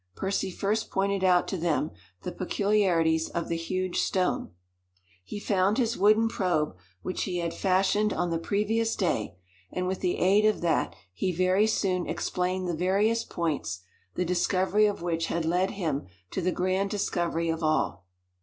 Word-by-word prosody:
Percy 195 0 -1
first 205 +4 -1
pointed 195 0 0
out 180 -1 +4
to 190 - -2
them 160 -2 0 0.3
the - - -3
peculiarities 180 -5 +1
of 170 - -3
the 170 - 0
huge 185 +2 -2
stone. 185 -1 0 0.7
He 155 - -6
found 200 0 +1
his 235 -2 +1
wooden 215 +3 +4
probe 175 - 0 0.3
which 185 - -2
he 180 -2 -2
had 170 -1 -2
fashioned 195 +2 +2
on 175 -2 -1
the 165 - 0
previous 220 +5 0
day, 115 - -1 0.4
and 180 - -2
with 185 0 -2
the 180 -1 0
aid 195 +3 +4
of 215 0 +2
that 170 -2 +1 0.2
he 185 - -1
very 185 +4 +3
soon 185 -4 0
explained 180 +2 -1
the 175 - -1
various 200 +7 +2
points, 150 - -3 0.3
the 180 - 0
discovery 190 +4 +2
of 205 -4 -3
which 165 -1 -1
had 170 -1 -1
led 180 +3 +2
him 155 - -2 0.2
to - - -2
the 185 +1 +1
grand 185 +2 0
discovery 170 -5 -1
of 165 0 -1
all. 155 - 0
185 Hz, 165 wpm, -28 LUFS, 170-200 Hz, 0.7 s, out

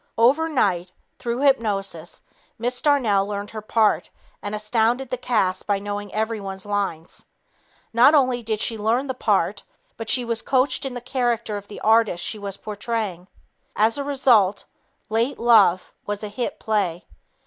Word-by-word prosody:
Overnight, 235 - +2 0.3
through 240 +2 -3
hypnosis, 200 - 0 0.3
Miss 245 +2 -2
Darnell 225 -10 +2
learned 205 0 -5
her 215 - -6
part 215 0 +1 0.3
and 205 +1 -4
astounded 225 +4 0
the 255 - -1
cast 210 -7 0
by 205 -1 +2
knowing 205 0 -5
everyone's 210 -3 -3
lines. 200 -5 -3 0.7
Not 245 +6 +6
only 255 -4 +2
did 220 -2 -3
she 225 -2 -1
learn 230 +6 +1
the 260 - -3
part, 250 - 0 0.4
but 225 -1 -6
she 250 -2 +2
was 230 -1 -2
coached 260 +2 +1
in 255 - -7
the 245 - -5
character 240 -3 -1
of 205 0 -7
the 210 - -10
artist 220 -5 +3
she 215 - -3
was 200 -1 -5
portraying. 205 -4 -4 0.5
As 225 +5 +2
a - - -1
result, 245 -8 +3 0.4
"Late 230 +5 0
Love" 215 -6 +4
was 205 +1 -3
a 210 - -4
hit 235 +4 -4
play. 195 -6 -1
220 Hz, 155 wpm, -23 LUFS, 205-245 Hz, 0.7 s, Not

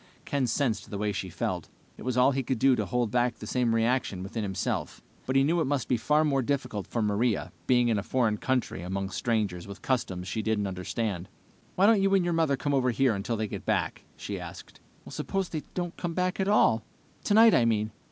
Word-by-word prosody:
Ken 140 -3 0
sensed 115 -3 -1
the 100 - -4
way 105 +1 0
she 95 -1 -4
felt. - - -3 0.3
It - - -14
was 125 -1 -2
all 125 +2 +5
he 135 0 0
could 130 0 -2
do 135 +3 +4
to - - -2
hold 120 -3 0
back 120 +1 +1
the - - -9
same 120 -3 +1
reaction 115 -5 0
within 100 +4 -4
himself, 95 -2 -3 0.2
but 130 - -1
he 135 - +5
knew 165 +4 +2
it - - +1
must 135 -2 -1
be 125 - +2
far 150 +7 +2
more 140 -3 +2
difficult 125 -6 -2
for 115 - -1
Maria, 105 +2 0 0.2
being 125 -1 +4
in 110 -3 +2
a - - -1
foreign 110 -1 +1
country 130 -8 -1
among 95 +2 -3
strangers 105 -6 -1
with 100 0 -10
customs 95 -8 -1
she 110 +4 -2
didn't 110 -1 0
understand. 95 0 -3 0.5
"Why 190 - +4
don't 215 -2 +5
you 195 0 +2
and 185 -2 +3
your 175 - +1
mother 160 -4 +2
come 145 +2 -1
over 130 -2 +2
here 130 0 +2
until 105 +3 -2
they 110 0 -1
get - - -6
back?" - - -1
he - - -5
asked. - - -10 0.3
"Suppose 195 -2 -3
they 155 - -3
don't 175 -1 -3
come 170 -2 -3
back 180 +1 0
at 190 - +1
all? 115 - +4 0.4
Tonight, 220 +2 +6
I 120 - +4
mean." 110 -1 +1
120 Hz, 225 wpm, -28 LUFS, 105-140 Hz, 0.5 s, Tonight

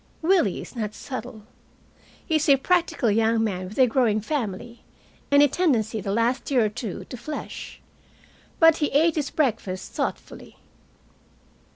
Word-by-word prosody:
Willie 335 - +2
is - - -10
not 215 -3 -4
subtle. 245 -4 -7 0.8
He 320 - +2
is 305 0 -1
a 280 - +8
practical 335 - +1
young 225 +1 +2
man 185 -4 -3
with 210 - -12
a 260 - +6
growing 230 -3 +2
family, 235 -2 -4 0.5
and 285 0 +6
a - - +6
tendency 235 - 0
the 195 - -3
last 230 +4 0
year 250 -5 +3
or - - 0
two 210 -2 -6
to 250 - -8
flesh. 300 +6 -7 0.8
But 325 -1 +6
he 295 - +1
ate 315 +4 +3
his 295 -3 -2
breakfast 220 -10 -2
thoughtfully. - - -5
245 Hz, 155 wpm, -24 LUFS, 215-295 Hz, 0.8 s, a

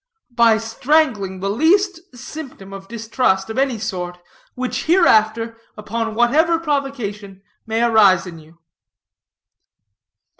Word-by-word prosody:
"By 230 -2 +4
strangling 225 -4 0
the 195 - -1
least 365 - +2 0.2
symptom 245 -8 -9
of 195 0 -10
distrust, 220 -3 -1
of 220 - -3
any 270 -3 +1
sort, 180 -5 -5 0.4
which 255 0 -3
hereafter, 230 - +3 0.2
upon 225 +1 -4
whatever 310 +8 +3
provocation, 240 - -4 0.2
may 225 +1 0
arise 205 -6 +4
in 170 -3 -9
you." 160 +2 -19
225 Hz, 110 wpm, -19 LUFS, 200-270 Hz, 0.4 s, By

